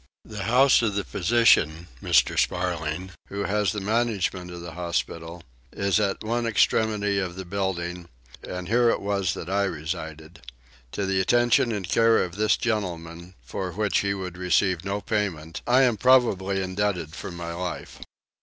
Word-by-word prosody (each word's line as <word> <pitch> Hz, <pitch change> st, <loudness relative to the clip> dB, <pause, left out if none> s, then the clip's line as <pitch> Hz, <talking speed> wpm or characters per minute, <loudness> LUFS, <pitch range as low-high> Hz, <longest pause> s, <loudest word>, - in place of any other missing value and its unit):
The 105 Hz, -3 st, -6 dB
house 125 Hz, +4 st, +5 dB
of 105 Hz, -4 st, 0 dB
the 100 Hz, -, 0 dB
physician, 90 Hz, -6 st, +3 dB
Mr. -, -, +3 dB
Sparling, 90 Hz, 0 st, -1 dB, 0.2 s
who 100 Hz, 0 st, -4 dB
has 105 Hz, -2 st, +1 dB
the 105 Hz, -, -3 dB
management 100 Hz, -4 st, -1 dB
of 90 Hz, -1 st, -8 dB
the 85 Hz, 0 st, -7 dB
hospital 85 Hz, 0 st, -4 dB, 0.3 s
is 100 Hz, +1 st, +1 dB
at 100 Hz, -2 st, -1 dB
one 115 Hz, +2 st, -1 dB
extremity 105 Hz, -2 st, +2 dB
of 90 Hz, -3 st, -3 dB
the 95 Hz, 0 st, -7 dB
building: 90 Hz, -2 st, -3 dB, 0.3 s
and 90 Hz, -1 st, -6 dB
here 120 Hz, +3 st, +3 dB
it -, -, +1 dB
was 100 Hz, -3 st, -1 dB
that -, -, -7 dB
I 100 Hz, +1 st, +1 dB
resided. 80 Hz, -1 st, -6 dB, 0.5 s
To 100 Hz, -, -2 dB
the 95 Hz, 0 st, +1 dB
attention 120 Hz, +3 st, +3 dB
and 100 Hz, -5 st, -3 dB
care 115 Hz, 0 st, +4 dB
of 90 Hz, -1 st, -6 dB
this 105 Hz, +1 st, +2 dB
gentleman, 90 Hz, -5 st, -4 dB
for 95 Hz, -2 st, -5 dB
which 105 Hz, -1 st, +1 dB
he 100 Hz, 0 st, 0 dB
would 90 Hz, -2 st, -6 dB
receive 90 Hz, 0 st, +1 dB
no 100 Hz, +1 st, -3 dB
payment, 85 Hz, -8 st, -3 dB
I 130 Hz, +2 st, +5 dB
am 120 Hz, -4 st, +2 dB
probably 100 Hz, -6 st, +3 dB
indebted 95 Hz, -4 st, -2 dB
for 100 Hz, -, -7 dB
my 85 Hz, -1 st, -6 dB
life. 90 Hz, +1 st, -6 dB
95 Hz, 165 wpm, -25 LUFS, 85-105 Hz, 0.5 s, house